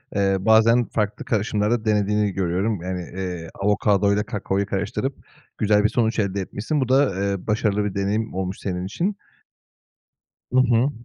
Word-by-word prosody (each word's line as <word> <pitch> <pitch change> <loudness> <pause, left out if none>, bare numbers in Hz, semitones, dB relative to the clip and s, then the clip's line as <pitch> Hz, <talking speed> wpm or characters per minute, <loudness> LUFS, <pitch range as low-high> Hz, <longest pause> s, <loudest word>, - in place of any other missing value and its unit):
eee, 100 -1 +2
bazen 110 +3 +4
farklı 105 -1 -2
karışımlar 105 0 0
da 115 -2 0
denediğini 105 -1 +1
görüyorum, 95 +2 -1
yani, 90 0 -3 0.2
eee, 90 -3 -4
avokadoyla 100 0 +2
kakaoyu 100 -2 -2
karıştırıp 105 +7 -2 0.4
güzel 105 -1 +3
bir 110 - +3
sonuç 115 -2 0
elde 100 -1 0
etmişsin. 110 +10 -2
Bu 130 - -1
da, 135 -6 +3
eee, 100 -1 -2
başarılı 105 -1 +1
bir 100 - -3
deneyim 105 +3 -1
olmuş 95 0 -3
senin 90 -1 -3
için. 180 - -2 1.4
Hı 130 - +5
hı. 125 +1 +3
105 Hz, 150 wpm, -23 LUFS, 95-110 Hz, 1.4 s, Hı